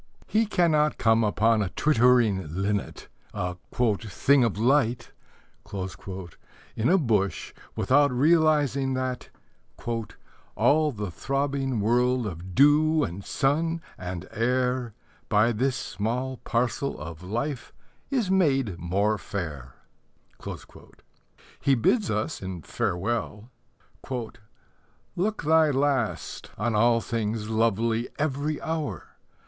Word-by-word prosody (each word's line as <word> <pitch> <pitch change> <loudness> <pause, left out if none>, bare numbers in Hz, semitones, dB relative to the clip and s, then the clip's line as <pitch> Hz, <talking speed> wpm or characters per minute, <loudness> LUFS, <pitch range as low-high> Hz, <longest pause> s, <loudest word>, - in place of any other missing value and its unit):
He 220 +1 +1
cannot 155 -6 +2
come 110 0 +3
upon 110 +1 +2
a 100 - -1
twittering 120 - +3
linnet, 100 +1 -2 0.3
a 90 -1 -3 0.4
"thing 125 +6 +2
of 115 -4 0
light," 120 0 +1 1.6
in 110 - +1
a 190 - +5
bush 110 - 0 0.2
without 145 +2 +3
realizing 145 -2 +3
that 130 -1 -3 1.3
All 150 +7 +3
the 105 -6 -5
throbbing 135 - -1
world 125 +3 +2
Of 90 -1 -7
dew 150 +2 +5
and 100 -4 -4
sun 160 +8 0 0.2
and 90 0 -6
air 125 0 0 0.3
By 110 +2 +4
this 125 +4 0
small 125 +4 -3
parcel 120 +4 -1
of 80 +2 -8
life 120 +8 -4 0.4
Is 240 -9 0
made 135 - +2
more 100 +5 0
fair. 75 -12 -6 1.8
He 140 - +3
bids 200 - +2
us 110 +6 -2
in 95 -4 -6
Farewell: 105 - -2 1.6
Look 205 +2 -1
thy 160 0 +4
last 135 -4 -1
on 120 - 0
all 115 +2 +3
things 110 -1 -3
lovely 115 +1 +1
Every 150 0 -1
hour. 155 - -3
120 Hz, 105 wpm, -26 LUFS, 105-145 Hz, 1.8 s, a